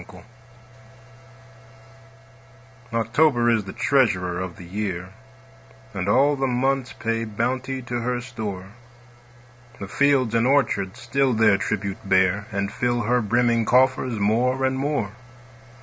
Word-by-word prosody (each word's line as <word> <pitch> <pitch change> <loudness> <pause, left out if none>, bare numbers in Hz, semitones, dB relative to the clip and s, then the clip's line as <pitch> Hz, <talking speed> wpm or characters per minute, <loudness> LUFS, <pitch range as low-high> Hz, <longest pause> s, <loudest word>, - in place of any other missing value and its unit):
OCTOBER - - -14 2.7
October 120 +2 +2
is 110 -4 +1
the 95 - -7
treasurer 95 -10 +1
of 95 -2 -6
the - - -10
year, 95 -1 -4 0.8
And 95 0 -3
all 140 +6 +4
the 135 -1 -1
months 130 +1 0
pay 115 0 -2
bounty 130 +4 -3
to 120 0 -3
her 125 +1 -2
store; 110 -7 -6 1.1
The 100 - -6
fields 135 0 +2
and 115 +1 +2
orchards 130 -9 +1
still 135 -1 0
their 105 -3 +4
tribute 100 0 -3
bear, 95 +2 +2
And 100 0 -3
fill 120 0 0
her 125 +3 +1
brimming 115 +1 +1
coffers 130 -1 +2
more 125 +6 +1
and 130 0 0
more. 135 -8 -1
115 Hz, 125 wpm, -23 LUFS, 100-130 Hz, 2.7 s, all